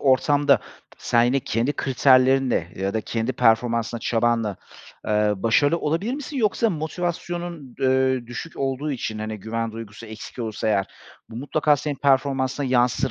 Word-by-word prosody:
ortamda 145 +2 +3 0.4
sen 120 - +2
yine 135 +3 +2
kendi 120 +3 -1
kriterlerinle 130 - +3
ya 95 +1 -2
da 110 - +1
kendi 115 +3 -2
performansınla, 115 -1 +1
çabanla, 115 -4 0 0.5
eee, 105 0 +2
başarılı 130 - +2
olabilir 170 - -1
misin? 290 0 -6
Yoksa 225 -1 +2
motivasyonun, 170 -2 -4
eee, 130 -1 +2
düşük 120 +7 -7
olduğu 135 +2 -2
için, 115 -4 -4
hani, 110 -1 -5
güven 115 +2 -3
duygusu 115 0 -9
eksik 110 +3 -10
olursa 110 -1 -3
eğer 100 -2 +1 0.4
bu 115 - -10
mutlaka 150 +3 +1
senin 145 +1 -3
performansına 135 0 +1
yansır 125 +1 +2
130 Hz, 140 wpm, -23 LUFS, 115-145 Hz, 0.5 s, ortamda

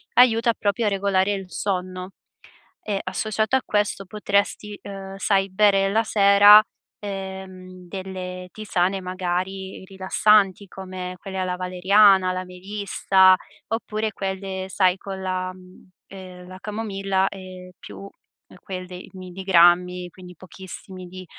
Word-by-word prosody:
aiuta 235 -1 +5
proprio 210 +1 -1
a - - +4
regolare 195 0 +1
il 195 -2 -6
sonno. 185 0 -3 0.8
E 200 -2 -1
associato 215 +5 -1
a 265 - 0
questo 205 -1 -1
potresti, 205 +1 -1
ehm, 195 -1 -8
sai, 195 -1 +1
bere 195 0 +3
la 220 +3 +2
sera, 205 0 +7 0.4
ehm, 190 -2 -8
delle 185 -1 -7
tisane 195 -3 -1
magari 185 +1 -4
rilassanti, 195 +1 +2
come 185 -1 -7
quelle 190 +1 -7
alla 185 -1 -2
valeriana, 185 +1 +4
la 185 0 -4
melissa, 190 0 +2 0.3
oppure 220 -1 -2
quelle 190 -1 -4
sai 185 -1 +2
con 195 -1 -7
la, 185 0 -2
mhmm, 185 0 -17 0.2
ehm, 185 -2 -11
la 185 0 -10
camomilla 195 -3 -1
e 185 -1 -11
più 195 - -10 0.6
quelli 185 -1 -8
milligrammi, 180 -1 +2
quindi 180 0 -13
pochissimi 185 +1 -11
di 185 +1 -10
190 Hz, 120 wpm, -23 LUFS, 185-200 Hz, 0.8 s, sera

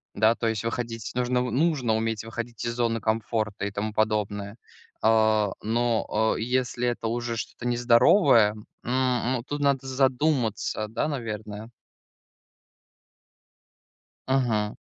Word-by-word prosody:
да, 110 +2 +4
то 115 - -2
есть 110 -1 -1
выходить, 115 -1 -4
нужно 125 0 0
нужно 125 -1 +1
уметь 110 -1 -1
выходить 115 +1 -6
из 115 - -1
зоны 115 -1 0
комфорта 110 -2 -1
и 100 - -3
тому 105 +2 -3
подобное. 105 -1 -1 0.5
А, 110 -2 +3
но, 110 -1 +1
э, - - -4
если 125 0 0
это 120 -1 -2
уже 120 0 -2
что-то 120 +1 -5
нездоровое, 120 - +5
м, 105 0 -12 0.7
м, 120 - -4
тут 145 0 -3
надо 140 -2 +1
задуматься, 130 -5 0
да, 115 +7 -2
наверное. 110 -5 -5 2.6
Мгм. 115 -6 +1
115 Hz, 120 wpm, -26 LUFS, 110-125 Hz, 2.6 s, нездоровое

